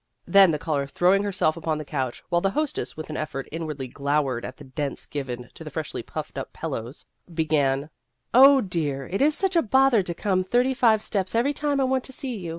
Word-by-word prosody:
Then 195 -2 +6
the 155 - +1
caller, 145 -2 -2
throwing 185 +7 +3
herself 185 -6 +1
upon 160 -2 -2
the 155 - -6
couch, 130 -4 -3
while 175 - +2
the 195 - +2
hostess 300 - -2
with 155 0 -6
an - - -4
effort 140 -3 -4
inwardly 155 -4 -4
glowered 140 -2 -1
at 130 - -7
the - - -12
dents 140 +1 -4
given 125 -4 -6
to - - -10
the - - -7
freshly - - -4
puffed - - -6
up - - -6
pillows, 120 +6 -6 0.3
be 160 -1 -1
gan, 145 -1 +1 0.2
" 125 +1 -53
Oh, 270 +2 +8
dear! 155 - -2
it 195 - -2
is 300 +2 +3
such 385 -1 0
a 335 - +5
bother 265 -2 +4
to 180 -2 -4
come 185 0 0
thirty 245 +7 +2
five 225 -4 +3
steps 195 0 -1
every 255 +5 +2
time 290 -1 -1
I - - +3
want 260 -1 +1
to - - -9
see 260 -2 -4
you. 180 -5 -6
170 Hz, 230 wpm, -25 LUFS, -, 0.3 s, Oh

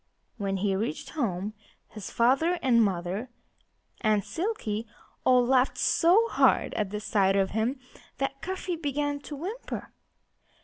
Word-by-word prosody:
When 195 -2 -1
he 195 0 0
reached 190 -5 -3
home 210 - -2 0.3
his 210 -3 -8
father 270 +9 +3
and 235 -3 +5
mother 190 +4 -2 0.7
and 215 -3 +2
Silkie 255 - -3 0.4
all 250 -1 +5
laughed 255 +1 +3
so 375 +7 +4
hard - - +3
at 210 -3 -1
the 210 +1 -4
sight 195 -2 +2
of 195 -1 +2
him 225 +6 -1 0.4
that 275 0 -3
Cuffy 370 -1 -3
began 290 -2 -2
to 290 +1 -8
whimper. 385 - -6
240 Hz, 135 wpm, -28 LUFS, 205-290 Hz, 0.7 s, and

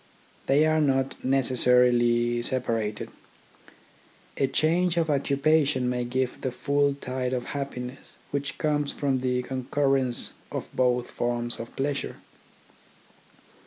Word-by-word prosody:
They 145 +3 +4
are 155 0 +3
not 135 -2 +2
neces 130 -2 +1
sarily 120 -1 +4
separated. 115 -5 -2 1.3
A 135 - +1
change 170 +5 +1
of 160 -2 +2
occupation 140 -1 +2
may 125 0 -1
give 130 +1 -2
the 130 - -1
full 140 +2 +1
tide 130 -2 -3
of 125 -1 -1
happiness 135 -2 -6 0.2
which 140 0 -3
comes 150 -2 0
from 135 -3 0
the 125 0 0
concurrence 130 -1 0 0.2
of - - -6
both 125 -1 +1
forms 120 0 -1
of 115 0 -8
pleasure. 140 +1 -2
130 Hz, 120 wpm, -26 LUFS, 125-140 Hz, 1.3 s, They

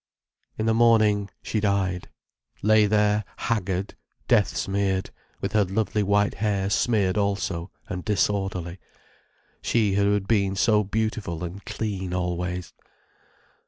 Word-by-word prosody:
In 110 - -1
the 115 - +3
morning 110 -3 +4
she 110 - -1
died—lay 100 +2 0
there 105 0 +2
haggard, 95 -4 -2 0.3
death 85 -5 +3
smeared, 95 -1 -1 0.3
with - - -3
her 105 -1 +4
lovely 105 +2 -1
white 100 +1 +2
hair 100 -2 -1
smeared 105 -4 +2
also, 100 -3 -1 0.2
and 90 -3 -5
disorderly: 95 -4 -1 0.8
she 110 -4 +1
who 100 +1 +3
had 100 -1 -2
been 100 -3 +2
so 105 +2 +3
beautiful 105 -4 -2
and 90 +4 -6
clean 95 -4 -3
always. 90 0 -3
100 Hz, 120 wpm, -25 LUFS, 95-105 Hz, 0.8 s, morning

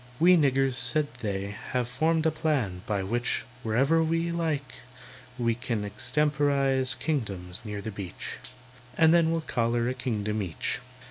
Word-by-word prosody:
"We 180 +2 +7
niggers," 135 -4 +2
said 135 +2 +2
they, 100 -1 -3 0.2
"have 125 -2 +1
formed 160 +5 +1
a 160 - +4
plan 135 - -1
By 100 -2 0
which, 120 +5 -1 0.2
whenever 135 +8 +3
we 165 +1 0
like, 160 -5 -2 0.6
we 115 -2 +1
can 115 -3 -3
Extemporise 135 +2 +1
kingdoms 100 - -3
near 105 -2 -5
the 110 - -4
beach, 100 -3 -6 0.6
And 160 0 +6
then 170 -1 +5
we'll 165 0 0
collar 120 -4 0
a - - -1
kingdom 110 -4 -2
each. 85 -6 -2
130 Hz, 145 wpm, -28 LUFS, 105-155 Hz, 0.6 s, We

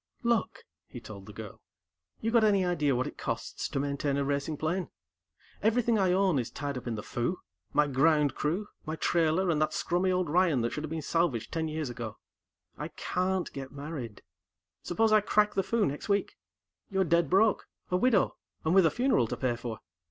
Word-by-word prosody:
"Look," 235 - 0 0.2
he - - -9
told - - -10
the - - -8
girl, - - -9 0.6
"You 225 - 0
got 230 -1 +5
any 200 -3 +4
idea 150 -6 +1
of - - +1
what 130 - 0
it - - -8
costs - - -3
to - - -2
maintain 140 0 -1
a 140 - 0
racing 140 +2 -1
plane? 170 +4 -1 0.7
Everything 225 0 +2
I 190 -2 +3
own 185 -5 +3
is 120 - -3
tied 140 -1 -4
up 125 -1 -6
in 115 - -1
the 105 - -5
Foo, 120 +10 -2 0.3
my 150 - +4
ground 145 +1 +3
crew, 175 +8 -1 0.2
my 155 - -4
trailer, 170 +2 +2
and 155 -2 +1
that 155 - +1
scrummy 180 +2 +1
old 180 -1 +1
Ryan 165 -4 +3
that 115 - -1
should 150 - -4
have 155 - -4
been 160 -1 -4
salvaged 145 -10 0
ten 160 -1 -1
years 155 -4 -3
ago. 115 -3 -6 0.6
I - - -3
can't 185 0 -2
get 135 -1 -6
married. 140 -6 -7 0.6
Suppose 220 +5 +1
I 215 0 +6
crack 210 +1 +2
the 195 - +2
Foo 220 +2 +1
next 145 +6 -4
week? 200 0 +1 0.5
You're 190 -2 +2
dead 170 -3 +2
broke, 210 +4 +3 0.2
a - - +2
widow, 220 0 +3 0.3
and 160 - +2
with 190 -3 +6
a - - +4
funeral 245 - +2
to - - -4
pay 125 -2 0
for. 115 -2 -6
165 Hz, 205 wpm, -29 LUFS, 140-190 Hz, 0.7 s, I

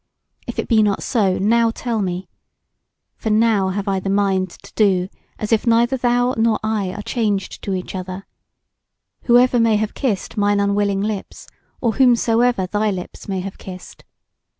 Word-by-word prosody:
If - - -6
it - - -2
be 225 -3 +4
not 205 -2 +1
so, 200 -6 +1
now 230 +4 +3
tell 225 -1 -2
me. 185 -1 -3 0.9
For 220 - -3
now 215 -3 +3
have 200 +2 -3
I 195 -1 +1
the 195 - -4
mind 195 -2 +1
to - - -16
do 190 -4 +2 0.3
as 215 - -4
if 225 +2 +2
neither 235 +3 +3
thou 245 0 +1
nor 225 -1 +2
I 215 -4 -1
are 210 +1 -6
changed 210 -5 -2
to 195 - -2
each 185 - -5
other, 185 +1 -6 1.0
whoever 245 0 +5
may 230 -1 +3
have 215 0 -1
kissed 225 -5 -2
mine 205 0 +2
unwilling 200 -1 +1
lips, 210 -1 -4 0.4
or 230 -4 0
whomsoever 240 -4 +3
thy 210 +3 0
lips 185 -3 -6
may 190 -1 -1
have 195 +1 -7
kissed. 185 -1 -10
210 Hz, 170 wpm, -20 LUFS, 195-230 Hz, 1.0 s, whoever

